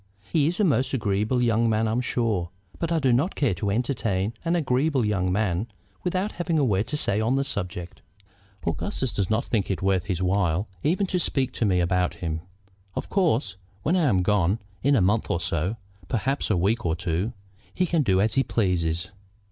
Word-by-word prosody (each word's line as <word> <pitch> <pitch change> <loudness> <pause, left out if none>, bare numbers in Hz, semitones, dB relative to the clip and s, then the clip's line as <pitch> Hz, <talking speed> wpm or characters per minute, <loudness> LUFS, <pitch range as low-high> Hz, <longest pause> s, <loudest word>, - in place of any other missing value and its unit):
He 150 -3 +4
is 175 +4 -2
a - - +4
most 135 - +2
agreeable 110 +2 +1
young 115 0 +3
man, 110 0 +2
I'm 115 +3 +1
sure; 110 -8 0 0.3
but 165 0 -2
I 165 - +3
do 135 -5 +3
not 145 +11 +1
care 135 -8 +2
to 100 +3 -2
entertain 110 -3 0
an 165 +1 +1
agreeable 135 -3 +1
young 95 -3 +1
man 100 0 0 0.4
without 185 +3 0
having 170 -2 -1
a 145 - +3
word 100 -3 +1
to 150 - -2
say 105 -7 +2
on 115 +4 +2
the 135 - +2
subject. 90 -8 -5 0.7
Augustus 130 - -2
does 100 -3 -1
not 110 +1 +1
think 105 -5 -1
it 95 -1 -2
worth 95 -2 +2
his 95 -4 -2
while 95 0 +1
even 180 +7 +1
to 180 -1 -1
speak 135 -5 0
to 120 - -1
me 95 -3 +3
about 90 +1 +1
him. 80 -2 -3 0.5
Of - - -4
course, 130 - +1 0.3
when 165 - +2
I 175 -4 +3
am 95 -4 +2
gone, 100 0 +2 0.2
in 140 +2 +3
a 115 - +4
month 105 +5 +2
or 85 - +1
so, 85 +3 -1 0.3
perhaps 130 +4 -1
a 105 - +2
week 105 +7 +1
or 80 -2 +1
two, 90 +6 -2 0.4
he 185 - +1
can 170 -2 +1
do 95 -8 +2
as 105 +2 +2
he 135 - +3
pleases." 90 -6 0
110 Hz, 205 wpm, -25 LUFS, 95-135 Hz, 0.7 s, He